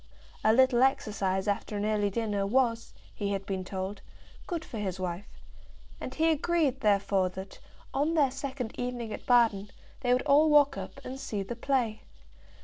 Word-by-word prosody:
A 220 - +5
little 255 +1 +4
exercise 205 -7 +1
after 205 +1 -1
an 205 - -1
early 210 -1 +1
dinner 205 -2 -1
was, 230 0 +1 0.2
he 200 -1 -2
had 195 0 -3
been 190 -1 -3
told, 190 +2 -5 0.5
good 335 -3 -3
for 225 - -6
his 190 -3 -3
wife; 180 +1 -4 0.7
and 255 - -6
he 325 +1 +3
agreed 315 -4 +1
therefore 200 -3 +2
that, 190 +1 -9 0.3
on 300 +4 +1
their 285 -5 +3
second 270 -3 -5
evening 245 -3 -3
at - - -8
Baden, 225 -5 +3 0.3
they 245 -3 0
would 250 +1 +3
all 300 +3 +5
walk 290 -2 +5
up - - -7
and 260 +1 -6
see 205 -6 -3
the 215 +5 -6
play. 235 -3 0
230 Hz, 170 wpm, -29 LUFS, 200-265 Hz, 0.7 s, A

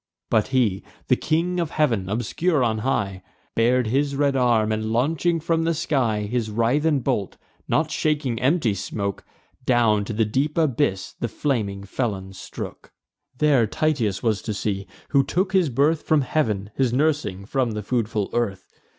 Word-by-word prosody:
But 110 - +3
he, 115 -8 +1 0.3
the - - +6
King 170 +3 0
of 170 -3 -1
Heav'n, 115 -13 0
obscure 135 - 0
on 110 -2 +1
high, 100 -6 -1 0.3
Bar'd 120 +2 +3
his 140 +5 0
red 140 -1 +2
arm, 120 -4 +3
and, 110 0 -1
launching 160 +8 +1
from 165 +1 0
the 165 0 +1
sky 130 -9 0
His 110 +1 -2
writhen 135 +7 +1
bolt, 115 -7 -1 0.3
not 155 0 +1
shaking 145 -7 0
empty 130 - +2
smoke, 100 +1 -4 0.4
Down 115 -5 +3
to 115 - -5
the 110 +1 +2
deep 140 +9 -1
abyss 135 - +1
the 120 - -1
flaming 105 -8 -2
felon 100 -3 -3
strook. 95 - -8 0.5
There 140 -6 +3
Tityus 115 -8 0
was 110 -5 +1
to 110 - -4
see, 100 -1 -2 0.2
who 140 -2 +4
took 185 +6 -1
his 185 -5 +3
birth 145 +5 +2
From 155 -2 +2
heav'n, 110 -8 -1
his 130 -3 +1
nursing 135 -8 0
from 125 0 0
the 105 0 -4
foodful 110 -3 -1
earth. 110 -6 -2
120 Hz, 160 wpm, -23 LUFS, 105-150 Hz, 0.5 s, the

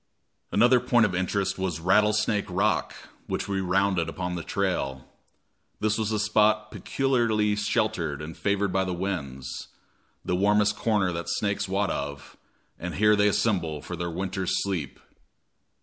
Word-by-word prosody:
Another 120 +4 +5
point 120 -1 +3
of 100 - -1
interest 95 +2 -1
was 90 -4 -2
Rattlesnake 105 +4 +2
Rock, 95 +4 0 0.3
which - - -2
we 100 -1 -1
rounded 95 -2 +1
upon 90 +1 -4
the 85 - -3
trail. 85 -10 -2 0.7
This 110 0 +1
was 110 0 -1
a 110 - +1
spot 105 0 +2
peculiarly 115 -6 +1
sheltered 105 -8 -1
and 75 +2 -7
favored 100 -1 0
by 95 - +2
the 90 -1 -2
winds, 70 -9 -4 0.6
the 90 - 0
warmest 105 +2 +3
corner 105 -5 +1
that 85 0 -4
snakes 100 -1 -1
wot 100 +1 0
of, 70 0 -5 0.4
and 90 0 -5
here 105 +1 +4
they 105 0 +3
assemble 90 -7 0
for 90 - -5
their 85 0 -3
winter's 95 +1 -2
sleep. 90 -9 -3
100 Hz, 150 wpm, -26 LUFS, 90-105 Hz, 0.7 s, Another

